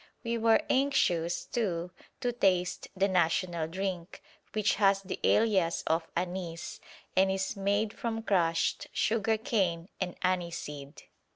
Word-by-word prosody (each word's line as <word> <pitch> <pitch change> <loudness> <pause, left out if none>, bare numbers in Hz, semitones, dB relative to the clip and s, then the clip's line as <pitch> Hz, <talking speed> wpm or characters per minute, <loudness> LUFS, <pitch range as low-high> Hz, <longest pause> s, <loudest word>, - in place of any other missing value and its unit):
We 235 -1 -1
were 225 -1 +4
anxious, 180 -12 +1
too, 180 -7 -2 0.3
to 245 - +1
taste 185 -6 +1
the 195 +1 +3
national 170 -2 +1
drink, 185 0 -4 0.3
which 215 -1 +2
has 195 0 +4
the 190 - -5
alias 195 -7 +3
of 165 +1 +1
"anise" 175 -1 -4 0.4
and 190 +1 +4
is 190 +3 -1
made 205 +2 0
from 225 -1 -3
crushed 170 -5 +1
sugar 220 0 +1
cane 190 -6 0
and 180 -2 -2
aniseed. 170 -6 -3
190 Hz, 125 wpm, -30 LUFS, 170-215 Hz, 0.4 s, were